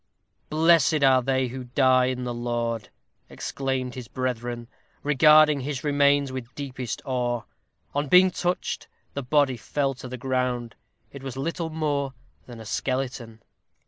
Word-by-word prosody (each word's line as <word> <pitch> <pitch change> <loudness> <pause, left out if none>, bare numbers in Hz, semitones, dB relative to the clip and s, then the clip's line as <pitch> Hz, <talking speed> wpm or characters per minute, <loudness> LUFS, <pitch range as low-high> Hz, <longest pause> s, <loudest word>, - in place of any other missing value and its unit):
"Blessed 160 -1 +4
are 130 -1 +6
they 130 0 0
who 130 +1 -6
die 130 0 +4
in 125 0 -2
the 120 -1 -3
Lord," 120 -2 -2 0.4
exclaimed 130 -2 -3
his 125 -3 -7
brethren, 120 -2 -3 0.4
regarding 150 +1 +6
his 135 -1 -4
remains 145 -1 +3
with 130 -2 -7
deepest 130 -4 -5
awe. 120 -3 -1 0.5
On 145 +1 -1
being 180 +5 +6
touched, 180 0 -2 0.3
the 140 - -3
body 135 -1 +2
fell 135 +4 -1
to 125 - -9
the 130 +1 -6
ground. 125 -2 -1 0.4
It 140 - -9
was 135 -1 -6
little 165 +4 -2
more 145 -4 -1 0.3
than 120 -2 -10
a 110 - -9
skeleton. 125 -1 -3
130 Hz, 145 wpm, -25 LUFS, 125-145 Hz, 0.5 s, are